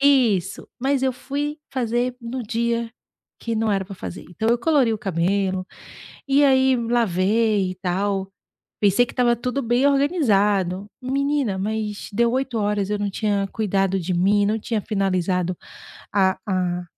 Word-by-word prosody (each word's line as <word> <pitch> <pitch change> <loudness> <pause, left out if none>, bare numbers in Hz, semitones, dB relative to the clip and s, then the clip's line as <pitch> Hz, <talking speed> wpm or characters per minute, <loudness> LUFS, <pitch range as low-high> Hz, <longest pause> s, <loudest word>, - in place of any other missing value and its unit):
Isso, 235 -10 +2
mas 270 +1 0
eu 265 -1 +2
fui 290 +4 -4
fazer 245 -1 -1
no 240 +2 -5
dia 235 +1 -1 0.5
que 230 -1 -2
não 220 0 +1
era 195 -1 0
pra 195 +1 -9
fazer. 90 - -7
Então 220 +6 -2
eu 235 - +4
colori 275 -4 +3
o 220 - -2
cabelo 190 +1 0 0.6
e 280 +2 +4
aí 265 -1 +4
lavei 220 -3 +1
e - - -5
tal. 195 +1 -1 0.5
Pensei 205 +4 +4
que - - -10
estava 240 -1 +3
tudo 250 +3 -2
bem 240 +2 +2
organizado. 210 - +2
Menina, 275 -4 0
mas 210 +1 -3
deu 235 +2 +2
20h, 215 -6 -1
eu 210 - 0
não 205 0 -1
tinha 200 -1 0
cuidado 195 -3 0
de 180 +1 -2
mim, 200 +4 +3
não 215 +2 +1
tinha 220 0 -2
finalizado 185 -3 0 0.6
a 190 -1 +3
a 180 -2 -1
215 Hz, 150 wpm, -22 LUFS, 195-250 Hz, 0.6 s, eu